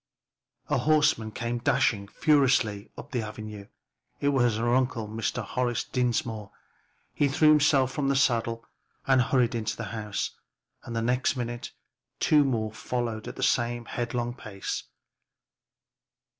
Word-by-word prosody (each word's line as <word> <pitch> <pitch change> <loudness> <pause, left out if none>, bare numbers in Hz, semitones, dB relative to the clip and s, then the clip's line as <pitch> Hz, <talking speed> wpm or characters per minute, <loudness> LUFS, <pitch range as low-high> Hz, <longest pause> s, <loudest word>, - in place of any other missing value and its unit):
A - - +1
horseman 150 -8 +3
came 120 +2 -3
dashing 105 -3 +1
furiously 125 -7 +2
up - - -10
the 125 -3 -1
avenue. 105 -1 -7 0.5
It 140 - +2
was 120 -5 +3
her 120 +1 +1
uncle, 125 -4 +1
Mr. 115 +2 -2
Horace 120 +2 -1
Dinsmore. 115 -4 -1 0.6
He 145 - +2
threw 155 +3 +4
himself 145 -3 +4
from 140 +1 -1
the 140 - +2
saddle 115 -3 +1 0.4
and 135 -1 +4
hurried 125 -2 +2
into 110 -2 -2
the 115 - -4
house, 105 -3 -3 0.5
and 115 - -6
the 115 - 0
next 125 +3 +1
minute 120 -1 -4 0.5
two 150 -1 +5
more 115 -5 -1
followed 115 -1 -3
at - - -6
the 135 - -4
same 120 -2 +1
headlong 120 0 -2
pace. 105 -5 -5
120 Hz, 140 wpm, -27 LUFS, 110-130 Hz, 0.6 s, two